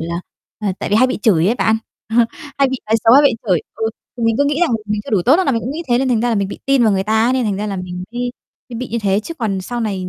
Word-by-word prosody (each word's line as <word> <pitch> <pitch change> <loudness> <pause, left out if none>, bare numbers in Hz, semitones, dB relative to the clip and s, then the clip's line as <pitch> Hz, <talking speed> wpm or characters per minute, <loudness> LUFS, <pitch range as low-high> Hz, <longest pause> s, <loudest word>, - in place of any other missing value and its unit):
là 170 +2 -3 0.4
ờ, 210 -2 -2
tại - - -3
vì 205 - +1
hay 255 +3 +5
bị 255 - -2
chửi 180 -6 +3
á 235 - +2
bạn, 220 0 +3 0.3
ờ, 225 - -2 0.4
hay 275 -1 +4
bị 265 - -2
nói 220 +1 +3
xấu, 225 - +6
hay 285 - +7
bị 285 - +5 0.2
chửi. 175 -5 +3
Ừ, 220 0 -1 0.3
thì 240 - -5
mình 230 -1 +2
cứ 285 - +4
nghĩ 290 +3 0
rằng 345 - +3
là 230 - +2
mình 210 0 -1
chưa - - -8
đủ 200 -5 +2
tốt 265 - +5
nên 375 - 0
là 275 - +3
mình 230 - 0
cũng 250 - -4
nghĩ 325 +4 -4
thế 240 0 +3
nên 265 - 0
thành 235 -3 +2
ra 240 - +1
là 230 - +1
mình 200 -2 0
bị - - -7
tin 275 -2 +3
vào 215 -3 +4
người 190 0 +1
ta 220 +1 +2
ấy 255 - +2
nên 260 -2 +1
thành 205 -3 -1
ra 210 - -3
là 200 -2 -3
mình 180 0 -6
mới 245 0 -2 0.4
mới 235 - -7
bị 255 - -5
như 235 - -2
thế. 200 +1 +2
Chứ 335 +9 -7
còn 210 -8 -2
sau 240 +6 -4
này 195 -5 -2
225 Hz, 350 wpm, -18 LUFS, 200-255 Hz, 0.4 s, hay